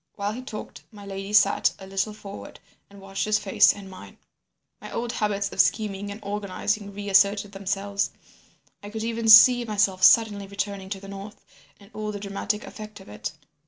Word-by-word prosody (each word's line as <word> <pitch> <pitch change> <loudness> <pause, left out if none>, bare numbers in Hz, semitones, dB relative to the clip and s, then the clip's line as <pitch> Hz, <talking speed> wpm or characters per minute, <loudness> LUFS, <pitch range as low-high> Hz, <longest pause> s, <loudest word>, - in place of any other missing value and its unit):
While 200 0 -2
he 240 +4 -6
talked, 225 -4 -8
my 205 -2 -12
lady 195 0 -6
sat 205 -1 +4
a 190 - -11
little 195 +2 -2
forward 205 -1 -10 0.3
and 200 0 -15
watched 195 0 -4
his 215 0 +2
face 210 -2 +4
and 200 -1 -10
mine. 190 - -12 0.6
"My - - -9
old 235 0 -3
habits 200 -3 -1
of 195 - +4
scheming 205 0 -1
and 205 +1 -7
organising 205 +1 -3
reasserted 200 0 +2
themselves. 200 +1 -2 0.7
I 205 - -9
could 220 +1 -5
even 230 0 -1
see 245 +3 +9
myself 205 -4 0
suddenly 210 -3 +5
returning 200 -1 -4
to 195 -1 -4
the 195 - -12
north, 200 +1 -10 0.3
and 200 +1 -18
all 215 0 -4
the 205 - -6
dramatic 205 +1 -3
effect 215 -1 -10
of 190 - -14
it. 105 - -6
205 Hz, 180 wpm, -25 LUFS, 195-215 Hz, 0.7 s, see